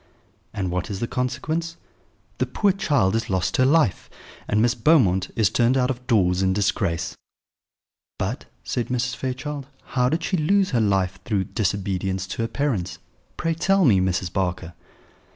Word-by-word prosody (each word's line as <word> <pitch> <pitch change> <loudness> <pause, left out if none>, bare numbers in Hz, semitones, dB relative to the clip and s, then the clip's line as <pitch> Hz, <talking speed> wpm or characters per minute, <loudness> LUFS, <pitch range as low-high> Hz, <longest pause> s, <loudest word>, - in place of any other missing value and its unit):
And 95 -4 -3
what 90 +3 -2
is 100 -2 -4
the 120 - -1
consequence? 160 +8 -2 0.6
The - - +1
poor 205 -2 +2
child 140 - +1
has 115 0 -1
lost 95 -1 0
her 130 - +4
life, 150 - +2 0.4
and 105 - +1
Miss 120 +2 +3
Beaumont 115 - +3
is 110 -5 +2
turned 120 +2 +3
out 125 0 +2
of 125 0 -8
doors 95 -6 +3
in 95 -1 +2
disgrace." 95 -4 -1 1.0
"But," - - -3 0.2
said 120 - -2
Mrs. 125 +1 -1
Fairchild, 135 +2 -4 0.3
"how 125 -1 +3
did 160 +4 -1
she 185 - 0
lose 190 +5 +2
her 120 - +2
life 95 -3 +1
through 100 -3 0
disobedience 95 -2 -2
to - - -3
her 115 - 0
parents? 115 -8 -2 0.4
Pray 165 - 0
tell 195 +3 +2
me, 105 -8 +5
Mrs. 90 -1 -1
Barker." 90 -3 -2
115 Hz, 165 wpm, -23 LUFS, 95-135 Hz, 1.0 s, me